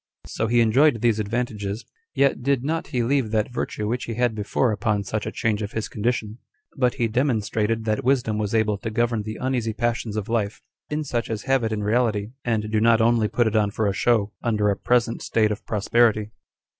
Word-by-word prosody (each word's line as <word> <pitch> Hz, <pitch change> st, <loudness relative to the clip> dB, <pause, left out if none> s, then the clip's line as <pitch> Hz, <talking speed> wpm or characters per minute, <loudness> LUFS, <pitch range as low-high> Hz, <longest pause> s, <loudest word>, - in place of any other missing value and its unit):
So 110 Hz, -, -2 dB
he 120 Hz, +1 st, +3 dB
enjoyed 120 Hz, +2 st, +4 dB
these 115 Hz, -3 st, +2 dB
advantages, 110 Hz, -1 st, -3 dB, 0.3 s
yet 140 Hz, -2 st, +2 dB
did 135 Hz, 0 st, +1 dB
not 160 Hz, +3 st, -2 dB
he 125 Hz, -5 st, -1 dB
leave 130 Hz, -1 st, +1 dB
that 110 Hz, +2 st, -1 dB
virtue 105 Hz, -3 st, -3 dB
which 120 Hz, +3 st, -2 dB
he 115 Hz, -, -5 dB
had 120 Hz, -1 st, +1 dB
before, 105 Hz, +3 st, 0 dB
upon 105 Hz, 0 st, 0 dB
such 105 Hz, +2 st, -3 dB
a -, -, -3 dB
change 110 Hz, -2 st, -1 dB
of 105 Hz, 0 st, -5 dB
his 110 Hz, -1 st, -2 dB
condition; 110 Hz, 0 st, -2 dB, 0.4 s
but 125 Hz, -3 st, +1 dB
he 115 Hz, -, +1 dB
demonstrated 110 Hz, -2 st, 0 dB
that 110 Hz, +4 st, 0 dB
wisdom 125 Hz, -5 st, +1 dB
was 105 Hz, +1 st, -1 dB
able 105 Hz, -2 st, +1 dB
to 110 Hz, -, -4 dB
govern 115 Hz, 0 st, 0 dB
the 110 Hz, +1 st, -6 dB
uneasy 125 Hz, -4 st, -1 dB
passions 115 Hz, -2 st, -2 dB
of 105 Hz, -, -3 dB
life, 110 Hz, -3 st, -2 dB, 0.3 s
in 150 Hz, +1 st, -2 dB
such 120 Hz, -5 st, -2 dB
as 110 Hz, -2 st, -3 dB
have 135 Hz, -2 st, +2 dB
it 110 Hz, -, -1 dB
in 105 Hz, -1 st, -2 dB
reality, 110 Hz, -1 st, +1 dB
and 110 Hz, -3 st, -1 dB
do 110 Hz, -1 st, +2 dB
not 115 Hz, 0 st, +5 dB
only 115 Hz, -1 st, +3 dB
put 120 Hz, +2 st, +1 dB
it 110 Hz, 0 st, 0 dB
on 105 Hz, -2 st, +3 dB
for 110 Hz, +1 st, -2 dB
a 100 Hz, -, +1 dB
show, 110 Hz, -1 st, +2 dB
under 105 Hz, -3 st, +1 dB
a -, -, 0 dB
present 120 Hz, +2 st, +1 dB
state 110 Hz, -2 st, +1 dB
of 105 Hz, -, -4 dB
prosperity. 110 Hz, 0 st, +2 dB
110 Hz, 215 wpm, -24 LUFS, 105-120 Hz, 0.4 s, not